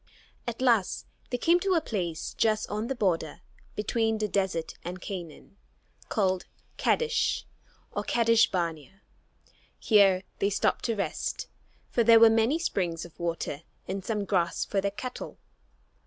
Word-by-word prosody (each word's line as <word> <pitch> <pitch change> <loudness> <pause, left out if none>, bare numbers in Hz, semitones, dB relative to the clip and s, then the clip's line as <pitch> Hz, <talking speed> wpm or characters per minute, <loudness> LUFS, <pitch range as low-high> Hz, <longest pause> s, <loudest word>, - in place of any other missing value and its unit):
At 240 +2 -3
last 230 -7 +2 0.2
they 245 - -1
came 340 +7 +4
to 380 0 +1
a - - +5
place 175 - -3
just 215 -1 +1
on 210 +2 -2
the 270 - -2
border 175 -9 -1 0.3
between 225 +1 0
the 215 0 -1
desert 190 -5 -1
and 180 +2 -5
Canaan, 180 0 -8 0.5
called 190 -4 0 0.3
Kadesh, 470 0 +1 0.5
or - - -3
Kadesh 230 -1 +4
barnea. 170 0 -3 0.7
Here 195 -4 +4 0.2
they 200 - +2
stopped 205 - 0
to 230 - 0
rest, 200 - -3 0.4
for 235 - +3
there 230 0 +8
were 225 0 +8
many 225 +7 +3
springs 175 - -2
of 170 - -15
water 170 -4 -3 0.3
and 190 0 -3
some 210 -1 -2
grass 175 -4 +1
for 195 - 0
their 200 - 0
cattle. 230 +5 -7
205 Hz, 145 wpm, -28 LUFS, 180-230 Hz, 0.7 s, there